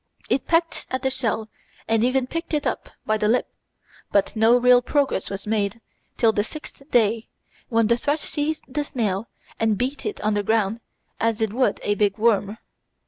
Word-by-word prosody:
It 270 - +1
pecked 330 0 +1
at 260 0 -3
the 265 - +1
shell 225 -4 -1 0.4
and 225 0 +2
even 255 +1 +2
picked 330 +4 -3
it 295 - -1
up - - -2 0.2
by 215 0 +1
the 210 - +2
lip, 240 +4 +1 0.6
but 200 +2 +2
no 225 +2 +5
real 245 0 +6
progress 275 -5 0
was 195 0 -6
made 210 0 -1 0.4
till 225 -2 +4
the 205 -1 0
sixth 305 +4 -9
day, 225 -3 +2 0.4
when 230 -2 +3
the 235 +2 +3
thrush 290 +5 0
seized 305 +1 -2
the 290 +3 -2
snail 220 -6 -2 0.3
and 220 -2 +2
beat 260 +6 -2
it 415 - -4
on 215 +1 +1
the 205 - +1
ground 220 +1 +1 0.4
as 225 -1 +1
it 220 -2 0
would 255 +2 +1
a 205 - +1
big 205 -1 +1
worm. 215 -2 +2
230 Hz, 190 wpm, -23 LUFS, 210-260 Hz, 0.6 s, real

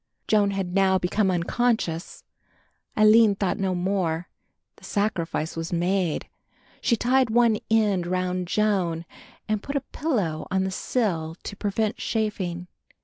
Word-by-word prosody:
Joan 205 -2 +3
had 195 -2 -3
now 190 -1 +4
become 190 +2 +1
unconscious. 180 -1 -1 0.7
Aline 215 0 +6
thought 195 -1 -1
no 190 -1 0
more; 175 -2 -1 0.5
the - - -21
sacrifice 175 -6 -1
was 165 0 -4
made; 175 -1 0 0.5
she 235 - +3
tied 250 +2 +2
one 230 -1 +3
end 205 -5 +2
round 185 0 -1
Joan 180 -5 0 0.4
and 215 -1 0
put 280 - -6
a 280 - +1
pillow 200 - -1
on 190 0 +1
the 190 - -2
sill 175 -7 -1
to - - -6
prevent 210 +1 -1
chafing. 185 -6 -2
195 Hz, 135 wpm, -25 LUFS, 175-215 Hz, 0.7 s, Aline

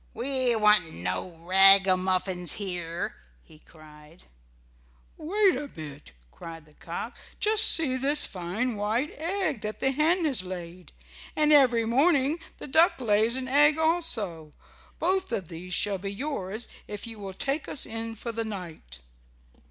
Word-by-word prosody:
"We 255 -1 0
want 210 -6 +3
no 90 - -5
ragamuffins 185 -1 +4
here," 175 -4 -3 0.3
he 155 - -19
cried. 155 +1 -18 0.9
"Wait 390 +4 +1
a 285 +2 -5
bit," 150 - -11 0.2
cried 165 -2 -11
the 150 - -22
cock. 170 - -8 0.2
"Just 430 0 +5
see 285 -6 +4
this 285 +3 +3
fine 200 +7 -3
white 220 +8 -2
egg 330 - -2
that 215 0 -5
the 270 - +1
hen 320 +5 +1
has 270 -10 +3
laid. 180 -1 -9 0.4
And 305 0 +3
every 245 -5 +4
morning 280 +5 +2 0.2
the - - -8
duck 315 +2 +3
lays 220 0 +2
an 260 0 -3
egg 295 +3 +4
also. 250 - 0 0.5
Both 375 +2 -1
of 180 -5 -4
these 175 +1 -5
shall 200 -2 -1
be 195 +1 -5
yours 220 -3 -5 0.2
if 210 -1 -7
you 225 -2 -9
will 195 -2 -8
take 275 +8 -2
us 275 - 0
in 225 0 -6
for 235 +2 -6
the 230 0 -4
night." 170 - -9
220 Hz, 145 wpm, -26 LUFS, 180-285 Hz, 0.9 s, Just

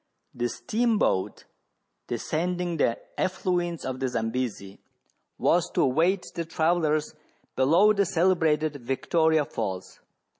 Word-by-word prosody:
The 120 0 -2
steam 235 - 0
boat, 95 - 0 0.6
descending 175 +7 -2
the 115 -5 +1 0.2
affluents 175 -2 -1
of 130 0 -4
the 135 - 0
Zambesi, 115 -4 -3 0.6
was - - +2
to - - +3
await 170 +8 +2
the 170 - -3
travellers 160 -2 0 0.4
below 165 +11 +5
the 200 -2 +1
celebrated 160 -4 +2
Victoria 155 +4 +1
Falls. 95 -7 -5
160 Hz, 110 wpm, -26 LUFS, 130-180 Hz, 0.6 s, below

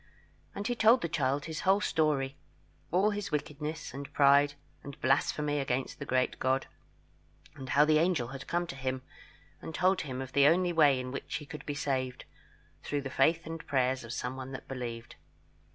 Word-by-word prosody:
And 200 - -4
he 245 - +1
told 235 +1 +5
the - - +1
child 140 -2 0
his 160 -1 -5
whole 195 0 +3
story 150 -8 +1 0.5
all 195 +5 +3
his 205 -1 -3
wickedness, 150 0 -4
and 140 +1 -7
pride, 145 0 +5 0.3
and 140 -1 -10
blasphemy 145 +2 +1
against 130 -1 -2
the 140 - -6
great 130 0 0
God; 130 +1 +1 0.9
and 135 -3 -8
how 145 +3 +5
the 155 0 +4
angel 160 -8 +1
had 135 0 -8
come 175 +1 0
to 165 - -7
him, 130 -1 -3 0.6
and 160 - -7
told 185 0 +3
him 130 -5 -5
of 130 -1 -6
the 140 +1 +6
only 175 +2 +3
way 145 -5 +5
in 125 0 -5
which 140 - -5
he 150 - -4
could 150 -1 -9
be 145 - -2
saved, 130 -3 -2 0.6
through 145 -1 -2
the 135 -1 -6
faith 160 +6 +2
and 165 0 -6
prayers 130 -2 +1
of 115 - -8
someone 130 +2 -5
that 130 - -8
believed. 120 -3 -6
140 Hz, 185 wpm, -30 LUFS, 130-160 Hz, 0.9 s, the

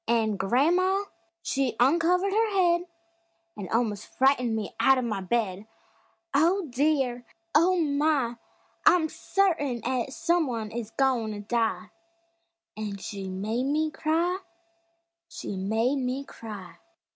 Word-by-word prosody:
An' 220 -3 +2
gran'ma 340 - +2 0.4
she 270 -3 0
uncovered 340 +8 +3
her 445 +1 +2
head 350 -1 +3 0.7
An' 195 -3 -7
almos' 220 -3 0
frightened 255 -4 +2
me 215 -2 -4
out 270 0 +5
of 255 - -1
the 215 -4 -2
bed; 200 0 -1 0.7
"Oh, 340 +6 +3
dear; 260 -2 +1 0.3
Oh, 350 +4 +4
my! 285 -5 +1 0.5
I'm 340 -3 +5
certain 325 -13 0
'at 255 0 -1
some 335 +2 +1
one 225 -4 -4
is 230 -2 -5
goin' 240 -4 0
to 205 - -6
die!" 225 +1 -1 0.8
An' 210 -2 -4
she 195 -1 -6
made 215 +7 -2
me 305 +3 0
cry 335 +4 0 0.9
She 330 -10 -6
made 220 +8 0
me 260 +1 -2
cry! 205 -9 -10
255 Hz, 125 wpm, -27 LUFS, 220-320 Hz, 0.9 s, out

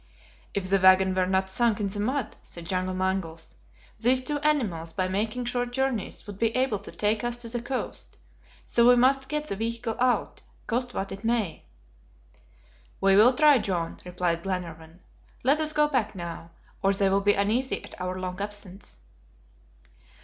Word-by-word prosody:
"If 195 -2 -1
the 195 +1 +3
wagon 185 0 +6
were 185 -1 +1
not 190 0 +1
sunk 225 +2 +1
in 205 - 0
the 200 +1 -5
mud," 260 +6 -1
said 170 -1 -10
John 185 +1 -1
Mangles, 185 -4 -2 0.5
"these 250 +3 +4
two 295 +1 -2
animals, 210 - 0
by 185 +2 0
making 215 +6 -2
short 245 0 -1
journeys, 265 -5 -2
would 205 -2 -9
be 230 -1 +1
able 255 -6 +1
to 200 - -10
take 210 +1 0
us 240 0 -1
to 240 -1 -7
the 240 0 -3
coast; 250 +2 -5 0.5
so 235 0 +3
we 250 - +8
must 265 +2 +3
get 300 0 -1
the 200 - -4
vehicle 230 +1 -3
out, 250 0 +1 0.2
cost 245 +1 -2
what 195 - -3
it 195 +2 -8
may." 225 -6 -1 1.3
"We 195 0 +4
will 225 +6 +7
try, 295 -2 +6
John," 180 -6 -2
replied 180 -2 -1
Glenarvan. 170 -2 -5 0.4
"Let 280 +5 +4
us 310 -1 +1
go 300 -1 +3
back 245 -8 -1
now, 170 -2 -7 0.3
or 195 0 +3
they 195 0 +2
will 195 +1 +2
be 205 +1 +4
uneasy 225 +7 0
at - - -11
our 185 0 -3
long 185 +1 -5
absence." 205 -1 -6
205 Hz, 175 wpm, -27 LUFS, 185-245 Hz, 1.3 s, we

